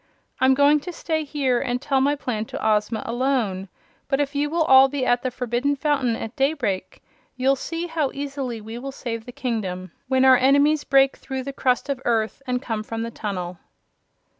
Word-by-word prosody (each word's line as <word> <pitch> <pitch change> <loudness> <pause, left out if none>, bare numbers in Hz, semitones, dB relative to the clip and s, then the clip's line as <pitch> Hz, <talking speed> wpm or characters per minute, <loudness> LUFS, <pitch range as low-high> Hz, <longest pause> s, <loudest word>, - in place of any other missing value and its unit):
I'm 260 0 +4
going 285 +2 +5
to 360 +5 -7
stay 320 -2 -2
here 275 -4 0
and 245 0 -1
tell 270 0 +1
my 285 +2 +2
plan 230 -6 -3
to 220 - -4
Ozma 215 +1 +1
alone, 230 -6 -1 0.4
but 270 - 0
if 290 0 -1
you 290 +1 0
will 330 +1 +1
all 265 -2 +7
be 270 -1 -2
at 245 0 +2
the 255 - -1
Forbidden 250 +3 -1
Fountain 275 -5 0
at 225 +1 -6
daybreak, 270 -9 -1 0.3
you'll 265 +2 +2
see 330 +5 -4
how 320 -5 -1
easily 275 -4 -4
we 225 +2 -7
will 275 +2 -6
save 230 -4 -5
the - - -6
kingdom 210 -9 -4 0.2
when 260 0 +3
our 260 -1 +8
enemies 285 +3 +3
break 270 -1 +3
through 265 -1 -5
the 275 +1 -6
crust 255 0 0
of 275 -2 -3
earth 225 +1 0
and 250 +1 -1
come 225 -4 -2
from 225 +1 -4
the 230 - -5
tunnel." 180 -6 -5
260 Hz, 195 wpm, -23 LUFS, 230-280 Hz, 0.4 s, our